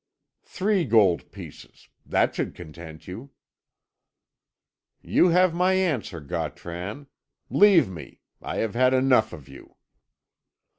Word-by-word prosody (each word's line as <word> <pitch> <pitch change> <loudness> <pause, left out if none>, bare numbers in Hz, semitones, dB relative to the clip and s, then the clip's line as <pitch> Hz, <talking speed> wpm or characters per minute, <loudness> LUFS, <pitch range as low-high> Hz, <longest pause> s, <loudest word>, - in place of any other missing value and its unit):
Three 195 -1 0
gold 100 - +2
pieces! - - -13 0.2
That - - +1
should - - -4
content 80 -1 -11
you." 110 +10 -9 1.7
"You - - +3
have 180 0 +3
my 180 +2 +2
answer, 150 - -1
Gautran. 90 - -6 0.5
Leave 200 -4 +5
me, 90 -4 -11 0.2
I - - -5
have 110 -2 -2
had 130 +2 +3
enough 130 -4 +3
of 70 - -11
you." 70 - -15
115 Hz, 110 wpm, -25 LUFS, -, 1.7 s, Leave